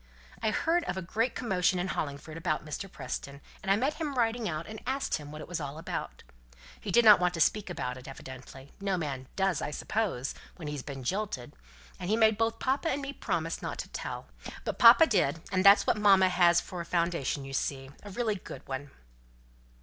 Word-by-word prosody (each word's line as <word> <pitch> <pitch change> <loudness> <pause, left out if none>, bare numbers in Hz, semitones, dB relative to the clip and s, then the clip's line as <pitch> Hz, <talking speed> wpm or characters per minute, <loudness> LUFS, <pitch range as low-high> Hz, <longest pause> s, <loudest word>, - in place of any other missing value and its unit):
I 220 - +2
heard 335 +9 +1
of 180 - -3
a - - -2
great 225 +8 -1
commotion 190 -6 +1
in 180 +1 -1
Hollingford 145 +1 -4
about 165 -2 -2
Mr. 180 +5 -5
Preston; 140 0 -6 0.2
and 195 - 0
I - - +6
met 275 +9 -1
him 295 -3 -2
riding 230 -2 +1
out, 155 0 -3
and 220 0 -8
asked 270 +1 0
him 145 -1 -10
what 155 0 -8
it - - -8
was 175 0 -3
all 145 0 -5
about; 160 - -5 0.6
he - - -7
didn't 220 -4 +8
want 180 0 +1
to - - -4
speak 205 +5 +2
about 125 -7 -4
it, 125 - -13
evidently. 130 0 -10
No 195 -2 0
man 135 -6 -4
does, 190 -5 +1
I - - -2
suppose, 150 - -2 0.2
when 165 -4 -8
he's 145 -2 -4
been 135 -1 -7
jilted; 190 - -3 0.5
and 180 - -4
he 220 - +3
made 220 -1 +5
both 225 0 +1
papa 270 +7 0
and 280 - 0
me 280 0 -5
promise - - -2
not - - -4
to - - -5
tell; - - -5 0.4
but - - -4
papa 245 +6 +9
did 175 - +1
and 185 -1 +2
that's 200 +1 +8
what - - +2
mamma 195 -3 +6
has 175 -2 +5
for 180 -2 -6
a - - -6
foundation; 170 -5 -1
you 135 - -8
see, 135 0 -2
a 205 - -10
really 220 +2 0
good - - -10
one." 135 +1 -5
180 Hz, 210 wpm, -30 LUFS, 145-220 Hz, 0.6 s, papa